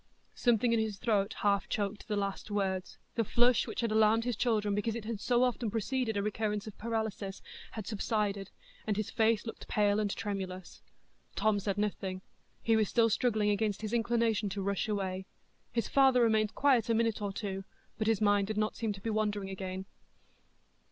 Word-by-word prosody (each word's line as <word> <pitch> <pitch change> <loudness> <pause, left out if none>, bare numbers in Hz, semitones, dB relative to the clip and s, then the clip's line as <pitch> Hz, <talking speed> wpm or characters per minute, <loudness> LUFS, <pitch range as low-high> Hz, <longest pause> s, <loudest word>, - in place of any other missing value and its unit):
Something 240 -1 +2
in 230 - +3
his 220 -2 -1
throat 205 -1 +1
half 200 -1 +2
choked 205 0 -2
the 210 - -1
last 200 +1 -3
words; 190 -3 -2 0.2
the 230 - +1
flush, 240 +3 +3
which - - -3
had 230 -2 0
alarmed 220 +1 +4
his 245 -2 0
children 215 -3 +1
because 210 +2 -1
it 230 -2 -5
had 225 -2 -3
so 245 +3 +2
often 245 -2 0
preceded 225 +1 -1
a 200 - 0
recurrence 210 0 -1
of 215 - -8
paralysis, 220 -3 -3 0.3
had 215 -3 -5
subsided, 205 -1 -1 0.4
and 210 -2 0
his 215 - -2
face 220 -1 +2
looked 225 - -7
pale 205 0 +2
and 210 -1 0
tremulous. 190 -3 -5 0.5
Tom 215 -1 +2
said 200 0 -2
nothing; 190 -2 -2 0.4
he 225 - +3
was 215 -2 +2
still 230 -2 +3
struggling 215 -3 +2
against 205 0 -1
his 215 +1 -3
inclination 230 -2 +1
to 195 0 -3
rush 200 +1 -1
away. 190 -2 -2 0.4
His 230 -1 -1
father 265 -3 +5
remained 220 -1 +2
quiet 260 -6 +3
a 230 - +3
minute 225 -1 +1
or 200 -1 -1
two, 195 -1 -4 0.4
but 215 - 0
his 225 -2 +2
mind 205 -1 +3
did 215 0 -3
not 215 0 0
seem 225 -2 -1
to 195 - -11
be 225 - -2
wandering 210 -2 -1
again. 190 0 -5
215 Hz, 190 wpm, -32 LUFS, 200-225 Hz, 0.5 s, father